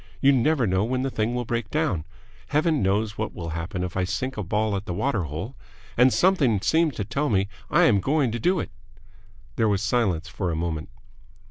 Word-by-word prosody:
You 140 - +5
never 135 0 +2
know 95 -1 +1
when 130 +3 -1
the 135 - -1
thing 115 +2 -1
will 125 0 -2
break 115 -2 -2
down. 140 - -1 0.4
Heaven 155 0 +1
knows 105 +2 0
what 110 - -3
will 85 -2 -5
happen 85 +4 -4
if 90 -1 -5
I 95 - +1
sink 105 +8 -2
a 105 - -3
ball 105 +2 0
at 100 +1 -4
the 90 - -3
water 110 -6 0
hole. 80 - -6 0.4
And 125 +2 +5
something 145 - +3
seems 155 - +2
to 105 - -3
tell 140 +8 -1
me 100 -3 +2 0.2
I - - +4
am 100 - +5
going 140 -1 +1
to 120 - -3
do 180 - +2
it." - - -4 0.9
There 110 -1 +3
was 100 0 0
a - - 0
silence 100 -8 +1
for 90 - -3
a 80 - -1
moment. 80 -1 -3
110 Hz, 220 wpm, -25 LUFS, 95-130 Hz, 0.9 s, You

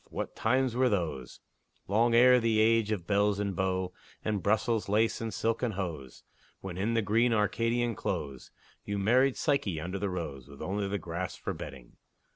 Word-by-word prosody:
What - - -5
times 130 -2 +1
were 130 0 +3
those, 85 - -3 0.5
Long 115 +4 +3
ere 125 +1 +7
the 115 -2 +2
age 110 -1 +3
of 95 -6 -2
belles 100 0 +2
and 100 -2 -2
beaux, 95 0 -1 0.3
And 105 -3 0
Brussels 110 +1 +1
lace 110 +3 +2
and 115 -1 -3
silken 115 +1 -1
hose, 80 -10 -6 0.4
When, 95 -2 -7
in 105 +5 -1
the 115 - +2
green 115 +4 +2
Arcadian 115 +2 +1
close, 70 - -4 0.3
You 100 0 -3
married 125 +7 +3
Psyche 110 - 0
under 90 +5 -4
the 100 +1 -1
rose, 75 -8 -5
With - - -13
only 100 +1 -2
the 100 +1 -1
grass 85 0 -4
for - - -4
bedding! 65 -4 -10
105 Hz, 175 wpm, -30 LUFS, 90-115 Hz, 0.5 s, ere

